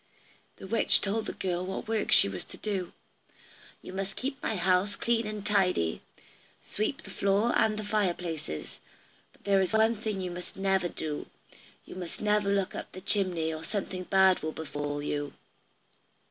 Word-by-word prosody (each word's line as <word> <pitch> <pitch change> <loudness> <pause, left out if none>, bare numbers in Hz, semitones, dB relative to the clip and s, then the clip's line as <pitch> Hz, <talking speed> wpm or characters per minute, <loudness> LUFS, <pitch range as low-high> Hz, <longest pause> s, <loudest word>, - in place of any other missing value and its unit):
The - - -10
witch 225 +4 +4
told 210 +2 -1
the - - -3
girl 180 -1 -2
what 190 +3 -4
work 220 -1 0
she - - +8
was 95 -2 -4
to - - -11
do. 195 -4 -2 0.9
"You - - -8
must 195 0 -3
keep 270 +2 -3
the 220 - -1
house 185 +2 +2
clean 230 -2 +1
and 210 -1 -5
tidy, 180 - +2 0.6
sweep 215 +6 -2
the - - -10
floor 200 +4 +2
and 220 -1 +3
the 215 - -3
fireplace; 180 - -2 0.5
but - - -27
there 195 -1 +4
is 190 +2 0
one 220 +1 +4
thing 215 -2 -3
you 180 -1 -3
must 180 +1 -8
never 190 -2 +2
do. 155 -3 -4 0.6
You - - -10
must 180 -2 -6
never 210 -1 +2
look 200 -1 +1
up - - -7
the 185 - -8
chimney, 180 -5 +1
or 155 0 -6
something 185 0 -3
bad 190 -1 +5
will 155 0 -3
befall 145 -1 -4
you." 145 -1 -2
190 Hz, 175 wpm, -29 LUFS, 175-210 Hz, 0.9 s, she